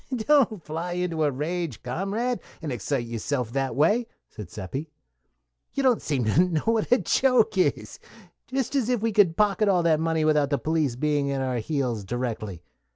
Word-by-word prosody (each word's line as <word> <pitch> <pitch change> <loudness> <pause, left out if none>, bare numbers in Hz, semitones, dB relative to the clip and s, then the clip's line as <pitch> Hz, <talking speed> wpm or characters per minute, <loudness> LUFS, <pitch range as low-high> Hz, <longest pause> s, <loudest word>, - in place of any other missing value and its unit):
"Don't 240 - +2
fly 165 +4 -4
into 175 -3 -1
a 150 - +3
rage, 150 - -3
comrade, 200 - -2 0.2
and 155 -4 -5
excite 125 +2 -2
yourself 115 +1 -3
that 135 -1 -1
way," 210 - +3 0.2
said 105 -5 -9
Seppi. 130 - -6 0.8
"You 275 - -1
don't 255 -4 +3
seem 135 -6 -1
to 135 +11 +4
know 170 -4 0
what 225 -1 0
a 250 - +7
joke 250 -5 +2
is. 185 - 0 0.5
Just 265 -1 -2
as 255 -4 +1
if 245 -4 0
we 230 - +1
could 195 -6 +3
pocket 210 0 +3
all 180 -3 +3
that 160 -2 +3
money 160 -1 0
without 150 -2 +3
the 140 - +1
police 155 -2 0
being 145 +1 0
at 135 -1 -1
our 130 -2 -1
heels 120 -4 -2
directly. 110 -5 -4
160 Hz, 180 wpm, -25 LUFS, 130-210 Hz, 0.8 s, a